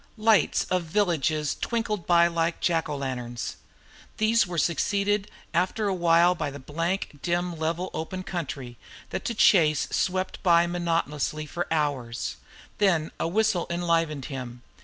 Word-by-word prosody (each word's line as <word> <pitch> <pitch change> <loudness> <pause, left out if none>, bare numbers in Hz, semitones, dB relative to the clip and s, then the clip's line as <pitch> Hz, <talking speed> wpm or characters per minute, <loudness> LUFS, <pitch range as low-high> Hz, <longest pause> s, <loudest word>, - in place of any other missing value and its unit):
Lights 215 -5 +3
of 185 0 +2
villages 160 -5 +1
twinkled 215 -6 -2
by 170 -1 +6
like 170 0 0
Jack 165 -3 +1
o' 145 - -2
lanterns. 125 -3 -4 0.6
These 220 -1 +3
were 175 -1 -5
succeeded 200 +5 +1 0.2
after 185 +5 +1
a 195 - +1
while 170 0 +4
by 155 -5 -3
the 140 - -8
blank 165 +3 -3
dim 175 0 -1
level 165 +3 -1
of - - -2
open 185 +3 -6
country, 140 -9 -5 0.3
that - - -3
to 235 - -2
Chase 155 -8 +4
swept 185 0 -1
by 170 -1 +5
monotonously 165 -3 -1
for 175 +4 -4
hours. 140 -7 -1 0.4
Then 170 -6 +2
a - - 0
whistle 215 0 +1
enlivened 165 -5 0
him. 125 -4 -7
170 Hz, 145 wpm, -26 LUFS, 150-185 Hz, 0.6 s, by